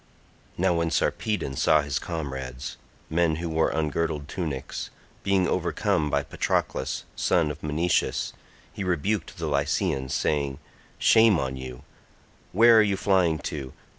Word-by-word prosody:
Now -, -, +2 dB
when 85 Hz, -1 st, 0 dB
Sarpedon 90 Hz, -3 st, -1 dB
saw 75 Hz, +3 st, +4 dB
his 70 Hz, -2 st, -2 dB
comrades, 65 Hz, -6 st, -5 dB, 0.3 s
men 80 Hz, 0 st, +2 dB
who 85 Hz, +2 st, -4 dB
wore 80 Hz, 0 st, +2 dB
ungirdled 75 Hz, -2 st, -1 dB
tunics, 80 Hz, -9 st, -4 dB, 0.3 s
being 95 Hz, -2 st, +2 dB
overcome 75 Hz, -1 st, 0 dB
by 70 Hz, 0 st, +1 dB
Patroclus 70 Hz, 0 st, -1 dB
son 80 Hz, -4 st, +2 dB
of 75 Hz, -, -9 dB
Menoetius, 80 Hz, +3 st, 0 dB, 0.4 s
he 100 Hz, -, -4 dB
rebuked 90 Hz, +4 st, -1 dB
the 85 Hz, -, -3 dB
Lycians 70 Hz, -1 st, 0 dB
saying. 70 Hz, -3 st, 0 dB, 0.4 s
"Shame 110 Hz, -4 st, +5 dB
on 65 Hz, -3 st, -2 dB
you, 65 Hz, -1 st, -8 dB, 0.7 s
where 115 Hz, +3 st, +7 dB
are -, -, +8 dB
you 100 Hz, -2 st, +1 dB
flying 95 Hz, -5 st, +2 dB, 0.2 s
to? 70 Hz, -4 st, -6 dB
80 Hz, 135 wpm, -26 LUFS, 70-90 Hz, 0.7 s, are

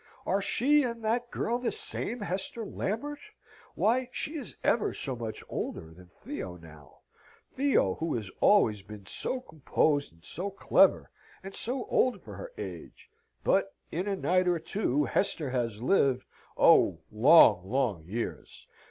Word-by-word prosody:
Are 195 Hz, +2 st, +1 dB
she 285 Hz, +9 st, +3 dB
and 235 Hz, -4 st, -3 dB
that 235 Hz, +2 st, 0 dB
girl 240 Hz, +1 st, -1 dB
the 250 Hz, -, -1 dB
same 430 Hz, -, -5 dB
Hester 195 Hz, +4 st, -3 dB
Lambert? 285 Hz, +10 st, -3 dB, 0.6 s
Why, 250 Hz, +3 st, +1 dB
she 300 Hz, -, -3 dB
is 285 Hz, -5 st, -6 dB
ever 230 Hz, -, +1 dB
so 135 Hz, -3 st, -3 dB
much 115 Hz, -2 st, -5 dB
older 80 Hz, 0 st, -5 dB
than 90 Hz, +2 st, -16 dB
Theo 90 Hz, 0 st, -7 dB
now 80 Hz, -4 st, -16 dB, 0.5 s
Theo, 265 Hz, -, +2 dB
who 165 Hz, 0 st, -1 dB
has 105 Hz, -5 st, -5 dB
always 110 Hz, -, +4 dB
been 100 Hz, 0 st, -11 dB
so 255 Hz, -, -3 dB
composed, 150 Hz, -, 0 dB
and 85 Hz, 0 st, -25 dB
so 185 Hz, +5 st, -3 dB
clever, 195 Hz, -, +3 dB, 0.3 s
and 195 Hz, 0 st, -8 dB
so 245 Hz, +4 st, -2 dB
old 255 Hz, -1 st, +1 dB
for -, -, -10 dB
her -, -, -8 dB
age. -, -, -9 dB, 0.3 s
But 195 Hz, 0 st, +1 dB, 0.2 s
in 180 Hz, +5 st, -2 dB
a 200 Hz, -, 0 dB
night 185 Hz, -1 st, +1 dB
or 175 Hz, -1 st, +3 dB
two 155 Hz, -, 0 dB
Hester 160 Hz, -6 st, 0 dB
has 115 Hz, -3 st, -2 dB
lived 135 Hz, -6 st, +2 dB, 0.3 s
oh, -, -, +5 dB
long, 110 Hz, -, +6 dB
long 120 Hz, -9 st, 0 dB
years! 115 Hz, +5 st, -6 dB
180 Hz, 150 wpm, -29 LUFS, -, 0.6 s, long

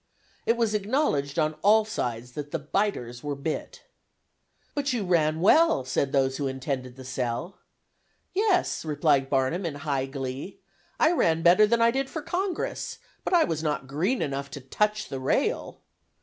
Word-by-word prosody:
It 230 Hz, -, +3 dB
was 230 Hz, -2 st, +1 dB
acknowledged 205 Hz, -, 0 dB
on 155 Hz, -1 st, +2 dB
all 215 Hz, +2 st, +5 dB
sides 125 Hz, -, -3 dB
that 145 Hz, +3 st, -6 dB
the 165 Hz, -, -2 dB
'biters 150 Hz, -, -2 dB
were 145 Hz, -1 st, -2 dB
bit.' 150 Hz, +3 st, -5 dB, 0.9 s
'But 285 Hz, -2 st, -1 dB
you 225 Hz, -5 st, -1 dB
ran 160 Hz, -3 st, +2 dB
well,' 215 Hz, -, +5 dB
said 135 Hz, +1 st, 0 dB
those 135 Hz, -1 st, +1 dB
who 140 Hz, -, -1 dB
intended 130 Hz, -1 st, -4 dB
the 130 Hz, -1 st, -11 dB
'sell.' 125 Hz, +6 st, -3 dB, 0.7 s
'Yes,' 390 Hz, -2 st, +1 dB
replied 145 Hz, -3 st, +2 dB
Barnum 135 Hz, +7 st, +1 dB
in 165 Hz, -4 st, -3 dB
high 140 Hz, -2 st, -2 dB
glee, 135 Hz, +6 st, -6 dB, 0.4 s
'I 315 Hz, -, +5 dB
ran 165 Hz, -, +2 dB
better 185 Hz, +5 st, +6 dB
than 230 Hz, +1 st, +3 dB
I 230 Hz, -, +5 dB
did 270 Hz, +2 st, -1 dB
for 315 Hz, -, -5 dB
Congress; 360 Hz, +1 st, -3 dB, 0.3 s
but -, -, -2 dB
I 340 Hz, -, +6 dB
was 160 Hz, -2 st, -2 dB
not 150 Hz, -3 st, -1 dB
green 170 Hz, -, 0 dB
enough 140 Hz, -1 st, -3 dB
to 140 Hz, -, -7 dB
touch 210 Hz, +11 st, 0 dB
the 135 Hz, -, -5 dB
rail! 130 Hz, -, -1 dB
155 Hz, 165 wpm, -26 LUFS, 135-215 Hz, 0.9 s, better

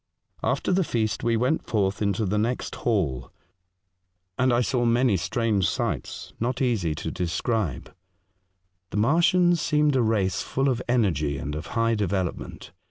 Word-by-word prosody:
After -, -, 0 dB
the 185 Hz, +1 st, +3 dB
feast, 110 Hz, -8 st, -1 dB
we 115 Hz, -1 st, +2 dB
went 125 Hz, +7 st, 0 dB
forth 100 Hz, -2 st, 0 dB
into 100 Hz, +1 st, 0 dB
the 105 Hz, +2 st, 0 dB
next 120 Hz, +4 st, -2 dB
hall, 80 Hz, -, -1 dB, 1.0 s
and 130 Hz, +3 st, +2 dB
I 120 Hz, 0 st, +3 dB
saw 125 Hz, 0 st, 0 dB
many 120 Hz, -1 st, +3 dB
strange 100 Hz, +1 st, 0 dB
sights -, -, -4 dB
not 125 Hz, +2 st, -1 dB
easy 105 Hz, -, 0 dB
to -, -, -4 dB
The -, -, -11 dB
Feast 85 Hz, -, -4 dB
151 110 Hz, -, 0 dB
describe. -, -, -20 dB, 0.9 s
The -, -, -4 dB
Martians 170 Hz, -, +3 dB
seemed 150 Hz, -2 st, +2 dB
a 130 Hz, -, +3 dB
race 100 Hz, -5 st, +1 dB
full 135 Hz, +1 st, 0 dB
of 125 Hz, -2 st, -1 dB
energy 80 Hz, -, +1 dB
and 70 Hz, +2 st, -4 dB
of 75 Hz, +1 st, -5 dB
high 115 Hz, 0 st, +2 dB
development. 95 Hz, -5 st, -3 dB
115 Hz, 165 wpm, -25 LUFS, 95-125 Hz, 1.0 s, the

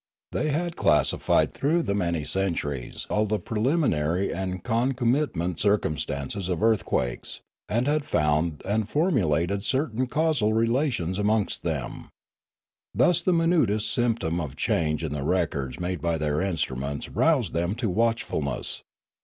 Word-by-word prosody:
They 155 Hz, -, -1 dB
had 170 Hz, +3 st, -1 dB
classified 75 Hz, -, +2 dB
through 165 Hz, +5 st, +1 dB
many 85 Hz, -, -1 dB
centuries 75 Hz, -9 st, -2 dB
all 105 Hz, 0 st, +2 dB
the 105 Hz, +1 st, +1 dB
preliminary 105 Hz, -, 0 dB
and 95 Hz, -1 st, -4 dB
concomitant 120 Hz, -, 0 dB
circumstances 80 Hz, -3 st, -1 dB
of 90 Hz, +3 st, -1 dB
earth 110 Hz, -3 st, +3 dB
quakes, -, -, -2 dB, 0.3 s
and 120 Hz, +3 st, +1 dB
had 150 Hz, +1 st, +1 dB
found 75 Hz, -, 0 dB
and 105 Hz, +2 st, 0 dB
formulated 100 Hz, -, +1 dB
certain 130 Hz, -1 st, 0 dB
causal 150 Hz, -7 st, +1 dB
relations 115 Hz, -, 0 dB
amongst 105 Hz, 0 st, +1 dB
them. -, -, -4 dB, 0.9 s
Thus 130 Hz, -, +4 dB
the 185 Hz, -, +1 dB
minutest 140 Hz, -, +2 dB
symptom 110 Hz, -9 st, 0 dB
of 70 Hz, -5 st, -5 dB
change 75 Hz, -1 st, 0 dB
in 75 Hz, -2 st, -2 dB
the 75 Hz, -, -3 dB
records 70 Hz, -5 st, -1 dB
made 90 Hz, -2 st, -3 dB
by 85 Hz, 0 st, 0 dB
their 75 Hz, +1 st, 0 dB
instruments 70 Hz, -6 st, -2 dB
roused 135 Hz, -, +1 dB
them 85 Hz, +4 st, 0 dB
to 120 Hz, -1 st, -2 dB
watchfulness. 95 Hz, -, 0 dB
100 Hz, 130 wpm, -26 LUFS, 80-120 Hz, 0.9 s, Thus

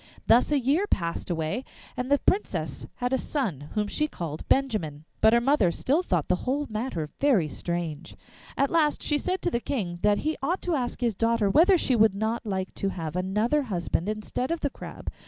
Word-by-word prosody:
Thus 245 Hz, +5 st, +4 dB
a 295 Hz, -, +4 dB
year 290 Hz, +11 st, +1 dB
passed 170 Hz, -, -2 dB
away, 165 Hz, +7 st, -1 dB, 0.3 s
and 250 Hz, +1 st, -3 dB
the 285 Hz, -, +5 dB
Princess 390 Hz, +8 st, -1 dB
had 250 Hz, +1 st, -2 dB
a 265 Hz, -, +2 dB
son, 175 Hz, -, -2 dB
whom 210 Hz, -1 st, +1 dB
she 300 Hz, +8 st, 0 dB
called 165 Hz, -, -6 dB
Benjamin. 190 Hz, -, 0 dB, 0.2 s
But 220 Hz, -, +7 dB
her 235 Hz, -, +6 dB
mother 240 Hz, -6 st, +3 dB
still 275 Hz, -, +1 dB
thought 180 Hz, -, 0 dB
the 180 Hz, -, +2 dB
whole 285 Hz, +3 st, 0 dB
matter 215 Hz, -, -3 dB
very 245 Hz, -, +3 dB
strange. 170 Hz, 0 st, -4 dB, 0.4 s
At 275 Hz, 0 st, +2 dB
last 310 Hz, -3 st, +2 dB
she 295 Hz, -1 st, +2 dB
said 370 Hz, +4 st, -2 dB
to -, -, +1 dB
the 235 Hz, -, +1 dB
King 195 Hz, -10 st, -3 dB
that 205 Hz, 0 st, +3 dB
he 310 Hz, 0 st, 0 dB
ought 345 Hz, +7 st, -1 dB
to 355 Hz, -, 0 dB
ask 255 Hz, -4 st, -2 dB
his 235 Hz, -2 st, +1 dB
daughter 230 Hz, -1 st, +1 dB
whether 355 Hz, -, +6 dB
she 260 Hz, -6 st, +2 dB
would 215 Hz, -3 st, +4 dB
not 220 Hz, +2 st, -2 dB
like 190 Hz, -2 st, -2 dB
to 195 Hz, -, -1 dB
have 165 Hz, -4 st, -5 dB
another 210 Hz, +10 st, +1 dB
husband 180 Hz, -5 st, -2 dB
instead 215 Hz, +4 st, -3 dB
of 335 Hz, 0 st, -2 dB
the 285 Hz, -, -1 dB
Crab? -, -, -8 dB
230 Hz, 205 wpm, -27 LUFS, 180-280 Hz, 0.4 s, But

